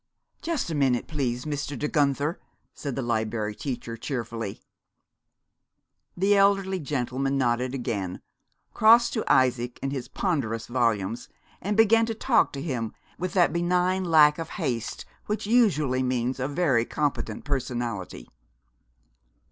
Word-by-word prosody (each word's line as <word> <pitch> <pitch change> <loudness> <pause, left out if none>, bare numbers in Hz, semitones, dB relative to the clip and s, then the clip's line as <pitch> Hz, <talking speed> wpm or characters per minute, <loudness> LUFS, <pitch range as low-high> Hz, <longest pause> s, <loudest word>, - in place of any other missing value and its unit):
"Just 325 - -2
a - - -1
minute, 135 -5 +1
please, 125 -5 -2
Mr. 145 -2 -3
De 150 - -1
Guenther," 145 +2 +1 0.3
said 140 -4 -5
the 135 - -2
Liberry 110 -2 -1
Teacher 120 -1 -5
cheerfully. 115 -4 -4 1.6
The 195 +3 +3
elderly 195 -1 +3
gentleman 135 -2 -1
nodded 125 0 0
again, 100 -8 -3 0.5
crossed 230 +2 +6
to 220 - -1
Isaac 125 -1 +2
and 135 - -1
his 135 -3 -4
ponderous 115 - -2
volumes, 115 -3 -1 0.3
and 205 +2 -2
began 225 +1 +5
to 225 - -3
talk 245 +2 +2
to 140 - -5
him 120 -8 -3 0.2
with 185 0 -3
that 175 -4 +3
benign 180 +2 +1
lack 155 -3 +5
of 165 - -5
haste 125 - -3 0.2
which 210 0 -2
usually 160 - +3
means 125 0 -1
a 130 - -1
very 145 -6 +2
competent 135 -5 -2
personality. 120 - -3
135 Hz, 130 wpm, -26 LUFS, 120-175 Hz, 1.6 s, crossed